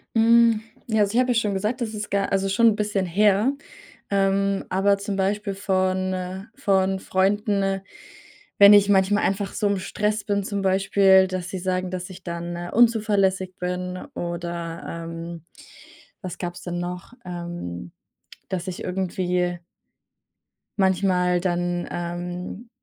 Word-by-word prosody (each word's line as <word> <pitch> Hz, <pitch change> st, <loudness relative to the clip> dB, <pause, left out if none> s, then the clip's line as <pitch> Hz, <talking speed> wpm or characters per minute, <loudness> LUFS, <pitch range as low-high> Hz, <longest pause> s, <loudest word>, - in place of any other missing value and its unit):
Hm, 230 Hz, -1 st, +5 dB, 0.3 s
ja, 220 Hz, -2 st, +2 dB
also 205 Hz, +1 st, +1 dB
ich 245 Hz, -, +3 dB
habe 255 Hz, 0 st, +2 dB
ja -, -, +3 dB
schon 210 Hz, -3 st, +1 dB
gesagt, 210 Hz, +6 st, -1 dB
das 220 Hz, -2 st, -2 dB
ist 210 Hz, 0 st, -5 dB
gar 200 Hz, 0 st, 0 dB
also 195 Hz, 0 st, +1 dB
schon 230 Hz, +4 st, +4 dB
'n 220 Hz, -, +4 dB
bisschen 205 Hz, -3 st, -1 dB
her, 205 Hz, +7 st, +3 dB, 0.6 s
ähm, 195 Hz, 0 st, +1 dB
aber 200 Hz, +2 st, +2 dB
zum 200 Hz, 0 st, -4 dB
Beispiel 200 Hz, +1 st, -1 dB
von 185 Hz, -1 st, 0 dB
äh, 185 Hz, +1 st, -4 dB
von 195 Hz, -6 st, +1 dB
Freunden, 195 Hz, 0 st, +1 dB, 0.8 s
wenn 200 Hz, +1 st, +10 dB
ich 205 Hz, -1 st, +6 dB
manchmal 200 Hz, +1 st, +3 dB
einfach 195 Hz, +1 st, -1 dB
so 210 Hz, -, -1 dB
im 200 Hz, -1 st, 0 dB
Stress 210 Hz, +2 st, -1 dB
bin, 200 Hz, -1 st, 0 dB
zum 200 Hz, 0 st, -3 dB
Beispiel, 190 Hz, 0 st, +4 dB
dass 185 Hz, -1 st, -4 dB
sie 190 Hz, -, -4 dB
sagen, 185 Hz, 0 st, -1 dB
dass 180 Hz, 0 st, -5 dB
ich 185 Hz, -, -12 dB
dann 170 Hz, 0 st, -5 dB, 0.2 s
unzuverlässig 205 Hz, -5 st, +2 dB
bin, 180 Hz, 0 st, -3 dB, 0.2 s
oder, 170 Hz, 0 st, -4 dB
ähm 165 Hz, 0 st, -7 dB, 0.8 s
was 185 Hz, -3 st, -6 dB
gab's 175 Hz, -1 st, -5 dB
denn 175 Hz, -1 st, -4 dB
noch? 180 Hz, +5 st, -6 dB
Ähm, 170 Hz, -, -6 dB, 0.6 s
dass 180 Hz, -1 st, -4 dB
ich 175 Hz, -, -6 dB
irgendwie 180 Hz, -1 st, -1 dB, 1.2 s
manchmal 180 Hz, -2 st, +2 dB
dann, 175 Hz, -1 st, -1 dB
ähm, 175 Hz, +5 st, -5 dB
190 Hz, 145 wpm, -24 LUFS, 180-205 Hz, 1.2 s, wenn